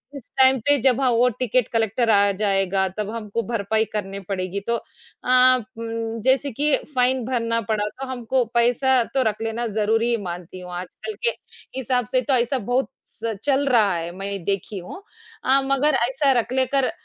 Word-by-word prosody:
इस 275 - -8
टाइम 265 -1 +6
पे 285 0 +4
जब 260 0 +3
हाँ, 260 - +3
वो 235 +2 +4
टिकट 250 0 0
कलेक्टर 225 +1 +1
आ 200 -1 +5
जाएगा, 195 -1 +1
तब 210 -1 -2
हमको 230 0 -3
भरपाई 220 -1 0
करनी 200 -2 -3
पड़ेगी। 190 0 -2
तो 235 - +2
अ 255 +2 +2 0.2
उम, 230 0 -4
जैसे 265 +2 +2
कि 290 +4 +2 0.2
फ़ाइन 255 -1 +2
भरना 230 -2 0
पड़ा, 210 0 -1
तो 270 +5 -8
हमको 255 0 0
पैसा 245 +2 +3
तो 265 -1 +2
रख 215 +1 -7
लेना 225 +1 -2
ज़रूरी 225 +3 +2
मानती 175 +1 -7
हूँ, 180 0 -9
आजकल 180 - -6
के 475 - +4 0.5
हिसाब 250 -1 0
से 255 - +3
तो 265 +2 0
ऐसा 250 +2 +1
बहुत 245 +5 0 0.2
स 225 -1 -5
चल 280 0 +2
रहा 220 -6 +4
है, 170 0 -4
मैं 195 +1 -5
ये 200 - -2
देखी 200 +1 -2
हूँ। 180 - -9 0.4
अ, 270 +1 +4
मगर 275 +2 +2 0.2
ऐसा 270 +1 +2
रख 240 - -3
लेकर 260 0 +1
235 Hz, 185 wpm, -23 LUFS, 210-260 Hz, 0.5 s, टाइम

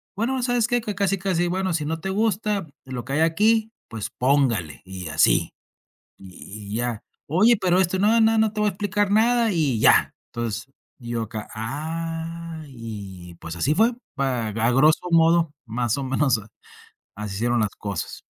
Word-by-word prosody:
Bueno, 250 +5 -1
¿sabes 245 -2 +2
qué? 245 -1 +1
Que 210 -2 -4
casi 195 -1 +1
casi 175 -2 0
bueno, 185 0 -1
si 155 -2 -1
no 165 +1 -2
te 190 - -4
gusta 210 -3 0 0.2
lo 125 -2 -5
que 135 - -5
hay 155 - +2
aquí, 220 +7 +3 0.2
pues, 110 -3 -6
póngale 125 - +1
y 95 -2 -7
así, 75 - +3 0.6
y 100 +2 -11
y - - -3
ya. 120 -2 -2 0.2
Oye, 210 +9 +4
pero 185 -1 +2
esto, 185 +1 0
no, 225 +3 +4
no, 220 0 +4
no 220 -1 +2
te 210 - -2
voy 210 - +3
a - - +4
explicar 205 +1 -1
nada 230 +1 +3
y 145 - +1
ya. - - +5
Entonces, 120 +2 -4 0.3
y 120 -1 -9
yo 115 -1 -1
acá. 110 -1 -6
Ah, 165 +6 -5
y, 100 -8 -9
pues, 85 +1 -6
así 145 - +1
fue 225 +3 +5 0.3
a 125 -5 0
a 115 +3 0
groso 155 +7 +4
modo, 165 -1 +4
más 120 +1 -1
o 140 - -3
menos 130 -3 +2 0.8
así 105 -2 -5
se 100 - -5
dieron 120 0 +1
las 105 -2 -1
cosas. 100 -2 -5
155 Hz, 185 wpm, -23 LUFS, -, 0.8 s, ya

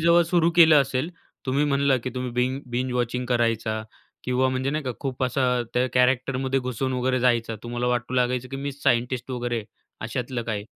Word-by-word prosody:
जेव्हा 170 +1 +5
सुरू 170 0 +2
केलं 160 -4 +8
असेल 135 +4 -1 0.4
तुम्ही 140 +3 +2
म्हणलं 140 -2 +2
की 130 - -2
तुम्ही 125 -1 -3
बिन 125 +3 0
बिंज 125 +1 -1
वॉचिंग 125 0 -1
करायचा 115 -2 0 0.4
किंवा 125 +1 +2
म्हणजे 130 +1 -1
नाही 150 0 -2
का 130 - -1
खूप 130 -1 -4
असा 130 +1 0 0.3
त्या 125 +1 +2
कॅरॅक्टरमध्ये 130 +1 +2
घुसून 130 +1 -2
वगैरे 130 0 0
जायचा. 115 -2 +1
तुम्हाला 120 +1 -3
वाटू 125 +1 -1
लागायचं 125 0 0
की 135 - -5
मी 140 +1 -4
सायंटिस्ट 125 -1 0
वगैरे 120 -2 -2 0.4
अशातलं 120 +2 -3
काही, 105 -3 -3
125 Hz, 180 wpm, -25 LUFS, 120-135 Hz, 0.4 s, केलं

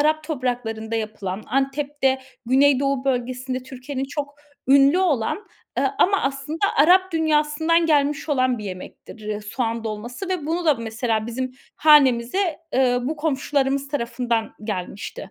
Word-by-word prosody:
Arap 310 +1 +2
topraklarında 245 -6 -3
yapılan, 215 -2 -4
Antep'te, 275 +1 0 0.3
Güney 270 +2 +4
Doğu 275 -1 0
bölgesinde 255 0 -2
Türkiye'nin 260 +1 -5
çok 285 +1 -5 0.3
ünlü 280 +4 +6
olan, 360 - 0 0.3
ııı, - - +2
ama 400 +2 +4
aslında 275 +3 -3 0.2
Arap 370 +4 +5
dünyasından 315 +1 +2
gelmiş 295 -1 +1
olan 255 -3 +1
bir 210 - -7
yemektir, 205 +3 -9
ııı, 210 0 -3
soğan 230 +1 -3
dolması 235 - -5
ve 360 -6 -2
bunu 340 +3 -1
da 305 -3 +5
mesela 225 -1 -2
bizim 255 +2 -4 0.2
hanemize, 295 +3 +4 0.2
ııı, 250 -1 +2
bu 310 - -3
komşularımız 280 -2 0
tarafından 235 -4 -1
gelmişti. 200 0 -5
270 Hz, 135 wpm, -23 LUFS, 235-300 Hz, 0.3 s, ünlü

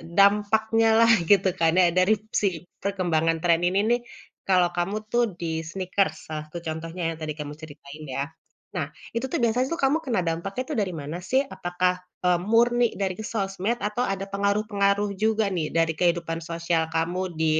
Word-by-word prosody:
dampaknya 215 +3 +4 0.2
lah 230 - +6 0.2
gitu 195 -1 +5
kan 165 -1 +4
ya, 185 - +6
dari 185 +4 +5 0.3
segi 190 -5 0 0.3
perkembangan 170 -5 +1
tren 170 -1 +4
ini 190 +2 +2
nih, 240 - +3 0.5
kalau 180 -2 +4
kamu 175 +4 -1 0.2
tuh 240 0 +3 0.2
di 170 - -4 0.2
sneakers, 185 -2 0 0.2
salah 155 -1 -3
satu 155 - -8
contohnya 165 +3 -5
yang 160 - -7
tadi 155 -1 -3
kamu 145 0 -5
ceritain 150 0 -10
ya. 140 - +1 0.5
Nah, - - -1 0.3
itu 235 - -1
tuh - - -1
biasanya 245 +3 +2
tuh 335 - -4
kamu 270 +3 +4
kena 235 -7 0
dampaknya 185 +9 -2
tuh - - -2
dari 185 -3 -2
mana 150 +5 -5
sih? 265 +2 +3
Apakah, 180 -8 -1 0.3
eee, 180 -1 +3
murni 240 +1 +4 0.2
dari 190 -1 0
ke 220 - -4
sosmed 195 +1 -1
atau 210 +3 -5
ada 195 0 -2
pengaruh-pengaruh 200 0 +1
juga 220 0 +3
nih, 155 -3 -1
dari 165 -1 +3
kehidupan 170 -2 +1
sosial 165 0 -1
kamu 165 +3 0 0.2
di, 160 - +2
185 Hz, 175 wpm, -25 LUFS, 165-210 Hz, 0.5 s, lah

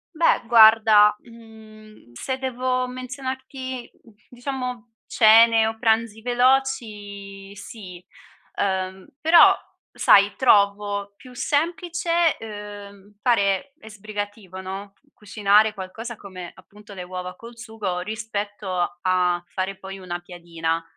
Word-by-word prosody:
Beh, 330 +1 +3
guarda, 220 -2 +6
mhmm, 220 - -16
se 260 - -4
devo 255 0 -1
menzionarti, 260 0 -6 0.4
diciamo, 250 -2 -6
cene 225 0 +5
o 225 - -4
pranzi 225 0 0
veloci, 215 -6 -1
sì. 185 -4 -11 0.5
Ehm, 190 -1 -2
però, 330 +2 +7 0.4
sai, 200 0 +4
trovo 200 -3 +2
più 255 +3 -15
semplice, 335 +3 0
ehm, 205 -1 -10
fare 230 +2 +1
e 220 - -13
sbrigativo 205 -2 -7
no, 195 +1 -7 0.2
cucinare 210 +1 +2
qualcosa 220 +5 -7
come, 185 -4 -10
appunto, 205 +3 -16
le 185 - -6
uova 180 0 -7
col 235 +1 -13
sugo, 220 -6 -5
rispetto 205 -3 -4
a 180 -1 +1
fare, 190 +1 -4
poi, 195 0 -9
una 175 -2 -5
piadina. 170 -2 -4
210 Hz, 105 wpm, -23 LUFS, 195-240 Hz, 0.5 s, però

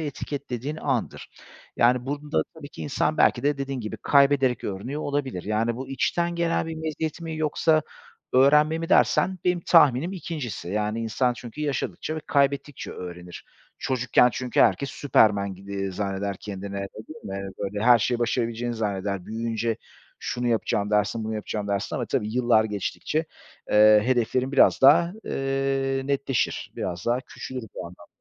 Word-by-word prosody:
etiketlediğin 145 -2 -4
andır. 135 -7 -2 0.5
Yani, 125 +1 +3
burada, 145 +1 -1
tabii 155 -3 -10
ki, - - -9
insan 150 +2 0
belki - - +3
de, 145 0 +1
dediğin 135 -1 -3
gibi, 110 0 -5
kaybederek 140 -3 +3
öğreniyor 125 +10 -4
olabilir. 135 -10 -2
Yani, 110 +3 0
"Bu 130 +1 -6
içten 170 +5 0
gelen 170 -1 0
bir 165 - -4
meziyet 160 +1 -4
mi 165 -1 -5
yoksa 155 +1 +2 0.5
öğrenme 150 +4 +5
mi?" 165 - -4
dersen 190 0 +3
benim 180 -1 +2
tahminim 160 -1 +4
2'ncisi. 145 - -5
Yani, 105 +3 -1
insan 115 +3 +1
çünkü 125 +3 -9
yaşadıkça 150 +1 -2
ve - - -3
kaybettikçe 140 0 0
öğrenir. 90 -1 -9 0.3
Çocukken 125 -1 +3
çünkü 125 +2 -1
herkes 140 - +3
Superman 100 -8 +2
gibi 100 0 -5
zanneder 100 0 -3
kendini, 100 -1 -6
öyle 100 0 -4 0.2
değil 155 0 -11 0.2
mi? 95 - -6
Böyle, 105 +1 -3
her 120 -1 +7
şeyi 120 +2 0
başarabileceğini 120 0 -1
zanneder. 100 -3 -3
Büyüyünce 115 0 -2 0.4
şunu 125 0 -3
yapacağım, 105 -3 0
dersin; 105 +2 +1
bunu 110 0 -3
yapacağım, 105 -1 -4
dersin 100 -1 -2
ama - - -2
tabii 105 +1 -2
yıllar 120 -3 +4
geçtikçe, 110 - -2 0.5
eee, 105 0 +7
hedeflerin 130 +1 +1
biraz 140 - +5
daha, 170 +6 +6
eee, 135 0 -1
netleşir. 140 -2 -1
Biraz 85 -1 -4
daha 120 +2 +2
küçülür 130 -1 -7
bu - - -6
anlamda. 85 0 -14
125 Hz, 155 wpm, -25 LUFS, 105-145 Hz, 0.5 s, her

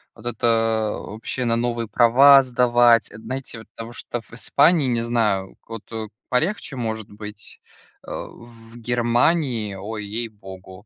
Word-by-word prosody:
вот 115 - -15
это 115 -2 +1
вообще 115 +4 -5
на 115 -1 +1
новые 120 -1 -1
права 135 +5 +7
сдавать- 120 -2 +3
это, 110 - -11
знаете, 125 0 -5
вот 110 - -14
того, 115 +1 -7
что 120 0 -5
в 115 - -26
Испании, 145 +5 +3
не 120 -2 0
знаю, 110 -5 0
вот, 115 -1 -7
э, 110 -1 -4 0.2
полегче 155 +2 -1
может 110 -3 -4
быть. 105 0 -8 0.5
Э, - - -7
в 115 -1 -10
Германии, 120 0 +1
ой, 105 +2 -6
ей-богу, 100 -4 -8
115 Hz, 145 wpm, -22 LUFS, 110-120 Hz, 0.5 s, права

